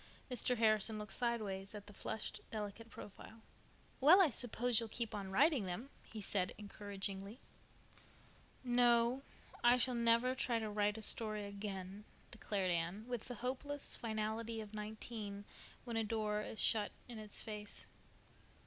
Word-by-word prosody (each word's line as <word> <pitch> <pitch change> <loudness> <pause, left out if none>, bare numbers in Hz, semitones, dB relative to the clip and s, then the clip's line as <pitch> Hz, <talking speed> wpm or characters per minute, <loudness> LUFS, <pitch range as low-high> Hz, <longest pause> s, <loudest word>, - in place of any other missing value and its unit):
Mr. 250 +1 +2
Harrison 215 -1 +4
looked 210 -1 -4
sidewise 215 -5 -1
at 205 -1 -7
the 205 - -11
flushed, 215 - -3
delicate 215 +1 -5
profile. 220 +1 -10 0.6
"Well, 315 +8 +9
I 350 -7 +6
suppose 245 0 +2
you'll 230 -1 -3
keep 230 0 -3
on 200 -2 -3
writing 270 - +4
them," 185 +10 -4
he 220 - -8
said 190 -2 0
encouragingly. 200 0 -5 1.2
"No, 240 0 +4 0.4
I 240 +1 +7
shall 250 +1 +2
never 235 +1 +4
try 250 -2 +1
to 220 -2 -2
write 210 0 +2
a 220 - -7
story 215 -1 0
again," 200 0 -5 0.3
declared 200 -5 0
Anne, 175 +5 -1
with 245 -3 -3
the 245 - -4
hopeless 285 +3 -1
finality 220 0 -2
of 215 -1 -7
nineteen 210 -1 -5 0.4
when 235 -2 -2
a 225 - +3
door 210 -1 0
is 215 - -5
shut 210 -2 +3 0.2
in 235 -3 -6
its 210 -1 -4
face. 210 -1 -5
220 Hz, 150 wpm, -38 LUFS, 205-235 Hz, 1.2 s, Well